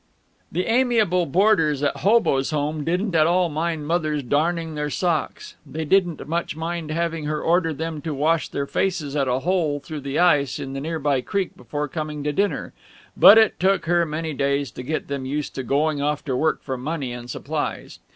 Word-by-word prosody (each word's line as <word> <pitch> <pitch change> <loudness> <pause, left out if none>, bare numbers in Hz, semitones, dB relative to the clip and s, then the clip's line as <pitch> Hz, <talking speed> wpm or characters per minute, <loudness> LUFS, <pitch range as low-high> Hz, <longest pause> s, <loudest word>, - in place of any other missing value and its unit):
The 180 +3 -1
amiable 225 -8 +2
boarders 165 -4 +3
at 145 - 0
Hoboes' 195 -10 +2
Home 150 0 -2
didn't 180 +5 -1
at 155 -1 +4
all 175 0 +2
mind 160 0 -2
Mother's 155 -3 0
darning 160 +5 0
their 150 0 -2
socks. 165 0 -2
They 155 +2 -5
didn't 175 -3 +1
much 170 0 -2
mind 165 0 -4
having 165 -1 -2
her 150 0 -1
order 165 0 +2
them 160 0 -4
to 160 - -4
wash 160 +3 +1
their 140 - -2
faces 155 -3 -1
at 140 -2 +1
a 130 +1 0
hole 165 -5 0
through 150 +1 -7
the 140 +2 -3
ice 150 -6 +3
in 135 -2 -6
the 135 - -4
near 160 +2 -3
by 140 -3 +1
creek 195 +7 -2
before 145 +4 -4
coming 150 0 -5
to 150 0 -1
dinner. 200 +6 -1 0.4
But 215 - +9
it 220 -1 +4
took 190 0 +2
her 175 +1 +3
many 155 +1 -3
days 140 0 0
to - - -8
get 155 +5 -3
them 140 -2 -4
used 145 +2 -3
to 130 - -4
going 145 +4 0
off 150 +1 -1
to 135 -4 -1
work 155 +5 0
for 130 -2 -3
money 135 -1 -4
and 120 0 -8
supplies. - - -4
155 Hz, 200 wpm, -23 LUFS, 145-170 Hz, 0.4 s, But